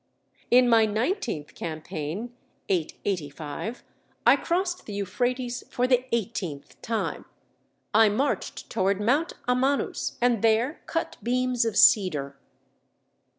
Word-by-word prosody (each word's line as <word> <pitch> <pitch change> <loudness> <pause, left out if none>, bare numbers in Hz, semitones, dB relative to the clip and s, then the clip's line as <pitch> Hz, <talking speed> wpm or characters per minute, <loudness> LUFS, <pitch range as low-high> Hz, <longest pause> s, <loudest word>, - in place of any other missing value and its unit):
"In 250 +1 +6
my 225 -2 +5
nineteenth 220 - -2
campaign 160 +7 -5 0.4
(885) 170 - -3 0.4
I - - +8
crossed 360 +1 -2
the 210 - -6
Euphrates 245 +5 -2
for 250 - 0
the 250 0 +2
eighteenth 195 -10 -3
time. 225 -1 -3 0.7
I 220 0 +6
marched 260 +8 -2
toward 190 +1 +1
Mount 275 +11 +1
Amanus, 260 +3 0
and 240 -3 +2
there 230 +6 +2
cut 330 - -2
beams 250 0 +1
of 225 -3 -1
cedar. 150 -9 +4
225 Hz, 110 wpm, -26 LUFS, 190-250 Hz, 0.7 s, I